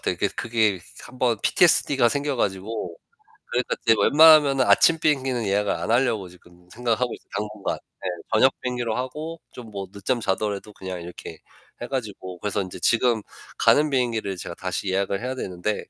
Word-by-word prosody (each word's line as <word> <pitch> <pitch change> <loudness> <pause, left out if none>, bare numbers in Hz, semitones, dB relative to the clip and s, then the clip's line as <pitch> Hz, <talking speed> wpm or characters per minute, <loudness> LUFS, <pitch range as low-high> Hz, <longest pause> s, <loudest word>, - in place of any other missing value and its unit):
같아요. - - -1
이게 - - 0
그 - - -16
그게 110 -5 +1 0.2
1 125 +1 -13
번 120 -4 +1
PTSD 155 -4 +4
가 120 - +4
생겨 140 +1 -1
가지고 105 - -3 0.6
그러니까 125 +1 0
이제 115 -1 +5
웬만하면은 145 0 +6
아침 165 -1 +5
비행기는 130 -7 0
예약을 100 +1 +1
안 - - -3
하려고 115 -6 +1
지금 90 0 -20
생각하고 120 0 -1
있어요 - - -13
당분간. 105 0 -3 0.2
네, - - -4 0.3
저녁 - - +5
비행기로 125 -3 -2
하고 150 +6 -5
좀 115 -3 -11
뭐 100 -2 -6
늦잠 110 +5 -2
자더라도 105 0 -2
그냥 95 -2 -7
이렇게 85 +1 -9 0.4
해 120 - -4
가지고. 100 -8 -5
그래서 105 +1 -2
이제 95 -1 -7
지금 115 -2 +2 0.4
가는 150 +1 +4
비행기를 115 -7 -1
제가 85 - -7
다시 95 +2 -4
예약을 100 +2 -1
해야 130 +1 -3
되는데 95 -1 -3
115 Hz, 400 characters per minute, -24 LUFS, 100-130 Hz, 0.6 s, 웬만하면은